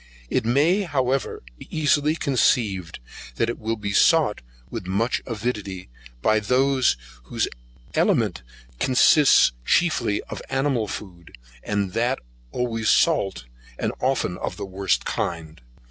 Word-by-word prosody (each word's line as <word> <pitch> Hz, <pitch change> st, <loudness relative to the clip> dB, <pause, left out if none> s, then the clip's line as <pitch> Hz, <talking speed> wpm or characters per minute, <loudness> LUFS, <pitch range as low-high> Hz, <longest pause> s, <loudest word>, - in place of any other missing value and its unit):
It -, -, 0 dB
may, 150 Hz, -, +3 dB
however, 135 Hz, -, -1 dB, 0.2 s
be -, -, -11 dB
easily 150 Hz, 0 st, +2 dB
conceived 110 Hz, -, +1 dB, 0.4 s
that 115 Hz, -, 0 dB
it -, -, -8 dB
will 115 Hz, +1 st, -2 dB
be 105 Hz, -2 st, -4 dB
sought 155 Hz, -4 st, +4 dB, 0.3 s
with 90 Hz, -, -6 dB
more 105 Hz, +6 st, 0 dB, 0.2 s
avidity 105 Hz, -, -4 dB, 0.3 s
by 110 Hz, 0 st, +3 dB
those 130 Hz, -, +2 dB, 0.3 s
whose -, -, -1 dB, 0.5 s
aliment -, -, +1 dB, 0.4 s
consists 135 Hz, -, +5 dB
chiefly 155 Hz, -, +1 dB
in -, -, -4 dB
animal 135 Hz, -4 st, 0 dB
food, 90 Hz, -, -9 dB, 0.3 s
and 100 Hz, -2 st, -2 dB
that 120 Hz, +4 st, +1 dB, 0.3 s
always 115 Hz, -3 st, -1 dB
salt, 100 Hz, -, +2 dB, 0.3 s
and -, -, -1 dB
often 130 Hz, -9 st, -1 dB
of -, -, -4 dB
the 100 Hz, -, -5 dB
worst 95 Hz, 0 st, -1 dB
kind. 80 Hz, -3 st, -4 dB
115 Hz, 125 wpm, -23 LUFS, 100-135 Hz, 0.5 s, consists